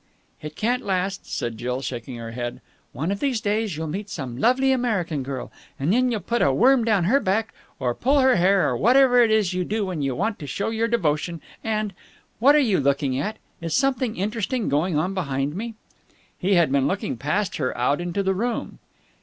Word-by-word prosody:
"It 150 0 -7
can't 245 +3 0
last," 195 0 -2
said 115 -2 -3
Jill, 125 +2 -3
shaking 120 0 -5
her 115 -1 -7
head. 120 0 -5 0.3
"One 160 +8 -2
of 200 - -2
these 265 -5 0
days 210 -4 -1
you'll 160 - -3
meet 195 +7 -5
some 130 -6 -5
lovely 260 - +3
American 210 - 0
girl 130 -1 -5 0.3
and 145 +8 +1
then 250 +2 +3
you'll 225 -4 -1
put 235 0 -1
a 140 - +4
worm 245 - +4
down 210 -5 +2
her 240 +11 +3
back 220 0 0 0.3
or 125 -2 0
pull 270 - +1
her 260 -4 +4
hair 190 +2 +4
or - - 0
whatever 250 +2 +5
it 230 - +4
is 215 -4 +2
you 180 0 0
do 210 +3 -1
when 180 -5 -3
you 135 -2 -1
want 210 - -1
to 145 - -7
show 200 +11 -2
your 225 +1 0
devotion, 170 -6 0 0.2
and.... 215 -2 -1 0.5
What 280 +6 +6
are - - +6
you 230 -10 +3
looking 140 -1 +1
at? 215 +9 -3 0.2
Is 165 -1 -2
something 260 -4 +1
interesting 215 +4 -1
going 150 +3 +1
on 180 +5 0
behind 140 -5 -2
me?" 225 +3 -5 0.6
He 195 +1 +1
had 170 -6 +3
been 140 -1 +2
looking 185 -6 -2
past 170 - -1
her 130 -4 -2
out 140 +6 +1
into 175 +3 -2
the 190 0 +1
room. 235 +5 -3
190 Hz, 210 wpm, -24 LUFS, 145-225 Hz, 0.6 s, What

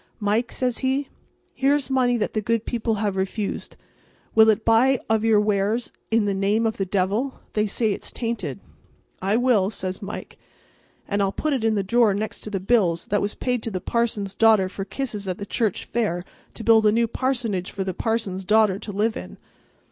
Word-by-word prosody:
"Mike," 220 +3 0
says 250 -2 -1
he, 270 +1 0 0.4
"here's 275 -1 +1
money 250 -2 +3
that 215 - -2
the 215 - 0
good 230 +1 0
people 230 -2 -1
have 205 -2 -1
refused. 195 +2 -3 0.6
Will 220 0 +7
it 220 0 +2
buy 245 +3 +4
of 220 -1 +2
your 220 -2 +4
wares 210 +3 0 0.2
in 225 -1 +2
the 200 - +1
name 200 +4 +1
of 220 0 -1
the 195 - -1
devil? 200 +8 -1
They 210 0 +1
say 215 +1 0
it's - - -6
tainted." 235 -1 -4 0.6
"It 200 +5 +1
will," 215 -7 +3
says 185 -3 -4
Mike, 200 +1 -7 0.7
"and 200 0 0
I'll 195 -1 +1
put 305 +8 -1
it 255 -5 -1
in 225 -1 +2
the 200 - 0
drawer 220 0 +3
next 215 +1 -3
to - - -6
the 200 -2 -2
bills 185 -5 +2
that 205 - +2
was 205 +1 -2
paid 250 -2 -1
to 225 - -4
the 190 -4 -3
parson's 210 -2 -1
daughter 220 -4 +4
for 195 +1 -6
kisses 210 -2 -4
at 185 -1 -2
the 200 - -6
church 215 -1 -1
fair 190 -7 -1 0.3
to 225 - -7
build 220 -1 +5
a - - +5
new 230 +2 +2
parsonage 230 -7 -1
for 195 - -4
the 190 -1 -3
parson's 205 -3 -2
daughter 210 -1 +3
to 205 - -6
live 215 +3 0
in." - - -8
215 Hz, 200 wpm, -24 LUFS, 200-235 Hz, 0.7 s, Will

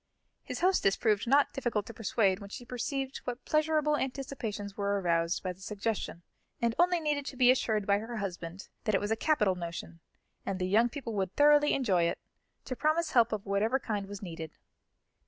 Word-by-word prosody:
His - - -6
hostess 360 - +3
proved 215 0 +1
not 280 +3 +4
difficult 235 -6 -1
to 230 - -9
persuade 200 -3 +1
when 200 -1 -9
she 245 +4 -8
perceived 265 +3 -3
what 245 -1 -5
pleasurable 305 -1 +2
anticipations 245 -7 -4
were 200 0 0
aroused 170 -2 0
by 185 -1 -2
the 185 - -21
suggestion; 205 -4 -3 0.4
and 235 -1 +1
only 355 0 +4
needed 295 -2 0
to 265 - -6
be 250 -1 +7
assured 220 -5 +1
by 200 0 +3
her 230 +2 -6
husband 180 -2 -5 0.2
that 215 - +2
it - - +3
was 205 +1 -3
a - - +3
capital 220 -8 +2
notion, 170 -1 -6 0.4
and 195 - -2
the 185 - -1
young 220 +6 +3
people 240 -3 -6
would 190 -2 -2
thoroughly 295 0 +5
enjoy 190 -10 +2
it, 170 - 0 0.5
to 255 - -4
promise 310 +4 +1
help 235 -3 +4
of 215 -2 -3
whatever 210 +5 +1
kind 210 -6 -3
was 205 0 -8
needed. 165 -3 -7
220 Hz, 190 wpm, -30 LUFS, 195-270 Hz, 0.5 s, be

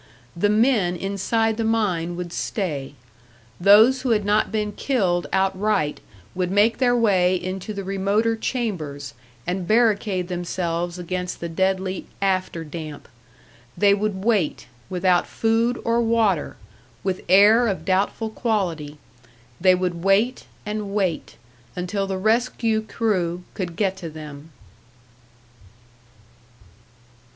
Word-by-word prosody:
The 205 +5 +1
men 210 -5 +3
inside 200 +4 -1
the 230 - -1
mine 190 -7 0
would 175 -1 -6
stay. 145 -9 -3 0.6
Those 215 +8 +6
who 260 - -2
had 210 -3 +2
not 210 +1 +2
been 210 -1 -1
killed 190 -8 0
outright 190 -4 0 0.3
would 180 -1 -1
make 205 +4 +3
their 245 -2 +3
way 190 -6 +3
into 185 +3 -4
the 200 -1 -5
remoter 200 +4 0
chambers, 170 - -4 0.3
and 180 0 -3
barricade 210 -5 +2
themselves 175 -1 -3
against 180 +1 -4
the 170 - -4
deadly 190 +2 -1
"after 185 -4 -1
damp." 155 -2 -8 0.7
They 205 -1 +5
would 200 -1 -2
wait, 210 -8 +1 0.2
without 180 -1 +2
food 230 +2 +1
or 230 +1 +2
water, 225 -7 +1 0.5
with 185 -1 -2
air 210 +6 +6
of 185 -6 -3
doubtful 200 +4 0
quality 175 -11 -2 0.6
they 185 0 +6
would 180 -2 -2
wait 210 +6 +2 0.2
and 210 -1 -4
wait, 185 -6 -1 0.4
until 195 +2 -2
the 190 -1 -2
rescue 225 +1 +1
crew 185 -6 -1
could 175 -4 -4
get 195 -1 0
to 170 -3 -6
them! 150 -1 -10
195 Hz, 120 wpm, -23 LUFS, 175-220 Hz, 0.7 s, Those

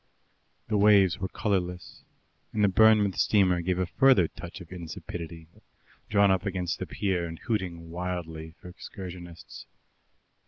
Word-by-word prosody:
The 105 -1 +1
waves 100 -4 +5
were 95 - -2
colourless, 90 -4 -3 0.5
and 105 - +1
the - - +6
Bournemouth 105 0 +4
steamer 95 -4 +3
gave 90 +1 -1
a 95 - 0
further 115 - +4
touch 85 +5 -10
of 90 -2 -13
insipidity, 85 -1 -8 0.6
drawn 100 -1 +4
up 95 -1 +1
against 90 -3 -2
the - - -4
pier 90 -4 -1
and 80 0 -8
hooting 90 -7 -4
wildly 85 -3 -5
for - - -12
excursionists. 90 -2 -10
90 Hz, 135 wpm, -27 LUFS, 85-100 Hz, 0.6 s, the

